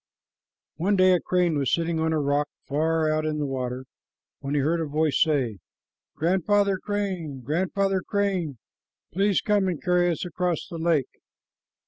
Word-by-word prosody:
One 190 Hz, +6 st, +1 dB
day 185 Hz, -1 st, +5 dB
a 180 Hz, -, +3 dB
crane 175 Hz, -4 st, +1 dB
was 135 Hz, -, 0 dB
sitting 165 Hz, -1 st, 0 dB
on 160 Hz, 0 st, +1 dB
a 160 Hz, -, +1 dB
rock 145 Hz, 0 st, 0 dB, 0.2 s
far 160 Hz, +2 st, +1 dB
out 155 Hz, 0 st, 0 dB
in 155 Hz, -1 st, -1 dB
the 150 Hz, -, -1 dB
water, 130 Hz, -1 st, -4 dB, 0.5 s
when 140 Hz, +1 st, -3 dB
he 145 Hz, -, +2 dB
heard 165 Hz, +4 st, +1 dB
a 160 Hz, -, -2 dB
voice 150 Hz, 0 st, +1 dB
say, 135 Hz, -, +1 dB, 0.6 s
"Grandfather 190 Hz, +4 st, +2 dB
Crane, 190 Hz, -10 st, -3 dB
Grandfather 190 Hz, +5 st, 0 dB
Crane, 190 Hz, -, -1 dB, 0.6 s
please 195 Hz, +2 st, +2 dB
come 205 Hz, -2 st, +2 dB
and 175 Hz, -5 st, -2 dB
carry 180 Hz, -1 st, +2 dB
us 170 Hz, +1 st, -2 dB
across 175 Hz, -1 st, -2 dB
the 170 Hz, -4 st, -7 dB
lake." 160 Hz, -5 st, 0 dB
165 Hz, 160 wpm, -25 LUFS, 150-185 Hz, 0.6 s, day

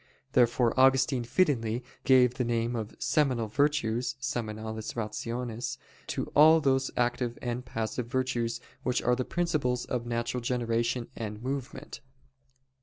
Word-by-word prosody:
Therefore 120 Hz, -1 st, +3 dB
Augustine 135 Hz, -1 st, +4 dB
fittingly 120 Hz, -4 st, +1 dB, 0.2 s
gave 125 Hz, -2 st, +5 dB
the 125 Hz, -, -1 dB
name 120 Hz, 0 st, 0 dB
of 110 Hz, -2 st, -5 dB
"seminal 130 Hz, -7 st, +1 dB
virtues" 125 Hz, -1 st, 0 dB
[seminales 110 Hz, -5 st, -4 dB
rationes] 115 Hz, +1 st, -4 dB, 0.3 s
to -, -, -2 dB
all 160 Hz, +2 st, +8 dB
those 135 Hz, -3 st, +1 dB
active 120 Hz, 0 st, 0 dB
and 120 Hz, 0 st, -3 dB
passive 115 Hz, 0 st, -3 dB
virtues 120 Hz, -2 st, -1 dB, 0.2 s
which 125 Hz, -1 st, 0 dB
are 125 Hz, -, +3 dB
the 130 Hz, -, -1 dB
principles 145 Hz, -7 st, -1 dB
of 120 Hz, -1 st, -3 dB
natural 120 Hz, +1 st, -2 dB
generation 120 Hz, 0 st, -1 dB
and 105 Hz, 0 st, -6 dB
movement. 135 Hz, +1 st, -5 dB
125 Hz, 125 wpm, -29 LUFS, 115-130 Hz, 0.3 s, all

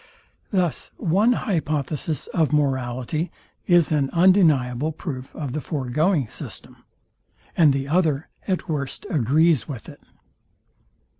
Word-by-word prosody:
Thus 180 Hz, -, 0 dB
one 200 Hz, +9 st, +3 dB
hypothesis 155 Hz, -, -2 dB
of 160 Hz, -3 st, +2 dB
morality 135 Hz, +2 st, -1 dB, 0.4 s
is 175 Hz, -3 st, +4 dB
an 145 Hz, -3 st, +1 dB
undeniable 160 Hz, -7 st, +3 dB
proof 140 Hz, -5 st, -7 dB
of 140 Hz, -5 st, -4 dB
the 155 Hz, -, -2 dB
foregoing 150 Hz, -, 0 dB
system, -, -, -7 dB, 0.8 s
and 155 Hz, -4 st, +5 dB
the 135 Hz, 0 st, -2 dB
other 155 Hz, -2 st, +1 dB, 0.2 s
at 185 Hz, -3 st, -1 dB
worst 145 Hz, -1 st, -3 dB
agrees 155 Hz, -, +3 dB
with 135 Hz, -7 st, -7 dB
it. -, -, -12 dB
150 Hz, 115 wpm, -23 LUFS, 135-170 Hz, 0.8 s, and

